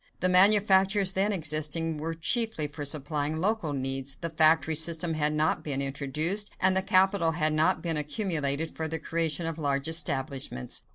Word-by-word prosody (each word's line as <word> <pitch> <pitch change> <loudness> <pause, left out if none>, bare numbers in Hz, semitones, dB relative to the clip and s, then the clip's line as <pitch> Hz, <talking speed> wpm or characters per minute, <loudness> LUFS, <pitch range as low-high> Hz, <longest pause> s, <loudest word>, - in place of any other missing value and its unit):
The 185 - +1
manufactures 195 0 +5
then 195 +2 -1
existing 160 -2 -1
were 165 +2 -5
chiefly 220 0 -1
for 145 0 -7
supplying 145 +1 -2
local 195 -2 -1
needs, 135 0 -3
the 170 -1 -6
factory 160 0 +3
system 165 +1 +1
had 150 -1 0
not 155 +1 -1
been 140 -3 -4
introduced, 150 +9 -2
and 185 0 +4
the 190 - +1
capital 190 -3 +1
had 155 -2 0
not 155 +1 0
been 165 -3 -2
accumulated 150 -2 -2
for 160 - -3
the 160 +1 -2
creation 165 0 -1
of 165 0 -5
large 140 -1 -2
establishments. 140 - -2
160 Hz, 165 wpm, -26 LUFS, 150-185 Hz, -, manufactures